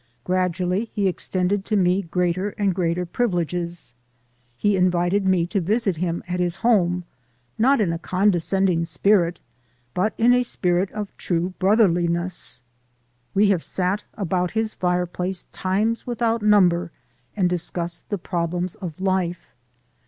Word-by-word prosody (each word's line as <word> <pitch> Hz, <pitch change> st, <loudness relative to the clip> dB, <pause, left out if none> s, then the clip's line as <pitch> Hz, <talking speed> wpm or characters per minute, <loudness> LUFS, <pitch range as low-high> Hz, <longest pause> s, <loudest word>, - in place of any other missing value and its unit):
Gradually 180 Hz, +2 st, 0 dB
he 200 Hz, -2 st, +2 dB
extended 185 Hz, +2 st, 0 dB
to 215 Hz, -, 0 dB
me 185 Hz, 0 st, +3 dB
greater 180 Hz, +2 st, -1 dB
and 200 Hz, -3 st, +1 dB
greater 175 Hz, 0 st, 0 dB
privileges; 175 Hz, -, -2 dB, 0.6 s
he 205 Hz, +5 st, +2 dB
invited 180 Hz, +1 st, +2 dB
me 185 Hz, -3 st, +3 dB
to 185 Hz, +3 st, -1 dB
visit 200 Hz, 0 st, 0 dB
him 170 Hz, 0 st, -2 dB
at 180 Hz, 0 st, -2 dB
his 175 Hz, -1 st, 0 dB
home, 180 Hz, -7 st, +2 dB, 0.6 s
not 265 Hz, +4 st, +4 dB
in 185 Hz, -6 st, +1 dB
a 165 Hz, -, -4 dB
condescending 185 Hz, -1 st, +1 dB
spirit, 170 Hz, +2 st, +2 dB, 0.5 s
but 210 Hz, +4 st, 0 dB
in 240 Hz, +2 st, +5 dB
a 250 Hz, -, +4 dB
spirit 185 Hz, -5 st, 0 dB
of 210 Hz, -2 st, -6 dB
true 175 Hz, +1 st, -1 dB
brotherliness. 175 Hz, -, +1 dB, 0.7 s
We 205 Hz, +1 st, +4 dB
have 185 Hz, -4 st, +2 dB
sat 190 Hz, +5 st, -1 dB
about 180 Hz, -2 st, -1 dB
his 220 Hz, -1 st, 0 dB
fireplace 180 Hz, +1 st, -1 dB
times 210 Hz, +6 st, -1 dB
without 235 Hz, -1 st, 0 dB
number 180 Hz, -5 st, +4 dB, 0.5 s
and 185 Hz, -3 st, +3 dB
discussed 175 Hz, -1 st, -3 dB
the 205 Hz, -, -1 dB
problems 175 Hz, 0 st, -2 dB
of 175 Hz, -5 st, -8 dB
life. 185 Hz, -2 st, -1 dB
180 Hz, 135 wpm, -23 LUFS, 175-200 Hz, 0.7 s, in